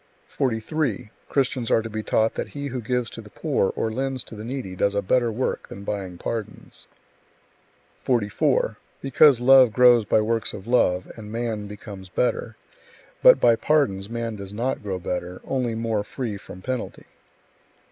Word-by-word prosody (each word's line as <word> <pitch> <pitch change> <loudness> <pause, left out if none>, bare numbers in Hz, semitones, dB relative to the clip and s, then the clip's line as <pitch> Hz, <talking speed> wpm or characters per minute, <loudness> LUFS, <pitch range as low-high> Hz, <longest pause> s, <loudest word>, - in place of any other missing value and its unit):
43. 120 -2 -2 0.2
Christians 130 -3 0
are 115 - +3
to - - -4
be 110 0 -4
taught 110 +1 +1
that - - -4
he 145 0 -6
who 125 -1 -4
gives 125 +1 -1
to 115 - -8
the 105 - -14
poor 135 -2 0
or 110 - -1
lends 130 +2 -2
to - - -11
the 105 - -8
needy 120 -6 -5
does 100 +2 +1
a 100 - +2
better 120 +4 +2
work 125 +4 -2
than 100 - -9
buying 95 -3 -4
pardons; 115 +1 -6 1.1
44. 125 - +1 0.2
Because 135 -1 +5
love 130 -1 +7
grows 120 0 +6
by 105 - +2
works 115 +1 -1
of 95 - -8
love, 90 -7 +2
and 105 -2 -9
man 115 -3 -3
becomes 100 -2 -10
better; 125 +6 -1 0.7
but - - +8
by 115 - +5
pardons 115 -9 +1
man 115 -1 -3
does 100 0 -8
not 125 +4 -1
grow 100 -3 -3
better, 90 0 -4
only 125 -4 -1
more 110 -2 -1
free 115 0 -4
from 95 -2 -11
penalty. 130 -1 -4
115 Hz, 165 wpm, -24 LUFS, 105-125 Hz, 1.1 s, but